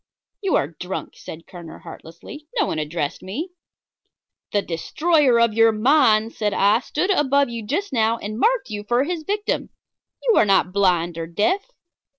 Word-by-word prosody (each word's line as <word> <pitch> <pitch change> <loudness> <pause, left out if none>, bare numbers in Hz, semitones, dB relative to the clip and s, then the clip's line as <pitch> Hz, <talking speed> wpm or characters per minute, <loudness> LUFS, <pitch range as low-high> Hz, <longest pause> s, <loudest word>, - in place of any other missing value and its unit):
"You 390 -4 +1
are - - +2
drunk," 180 +3 -7
said 165 +1 -10
Kerner, 170 -3 -11
heartlessly. 170 - -12
"No 410 - +3
one 155 - -3
addressed 150 -1 -3
me." 275 - -5 1.0
"The 205 -1 +1
destroyer 275 - +1
of 235 -2 +3
your 225 +1 +5
mind," 225 -1 +3
said 210 -2 -2
I, 205 +3 +4
"stood 330 - -2
above 280 -6 +2
you 230 -1 -6
just 305 - -3
now 225 -1 +2
and 215 +1 -6
marked 460 - +1
you 205 -1 -5
for 240 +4 +1
his 335 +2 -3
victim. 410 +5 -2 0.5
You 470 -3 +3
are - - +5
not 190 -2 +2
blind 175 -4 +1
or 165 - -4
deaf." 215 - 0
225 Hz, 165 wpm, -22 LUFS, 190-300 Hz, 1.0 s, your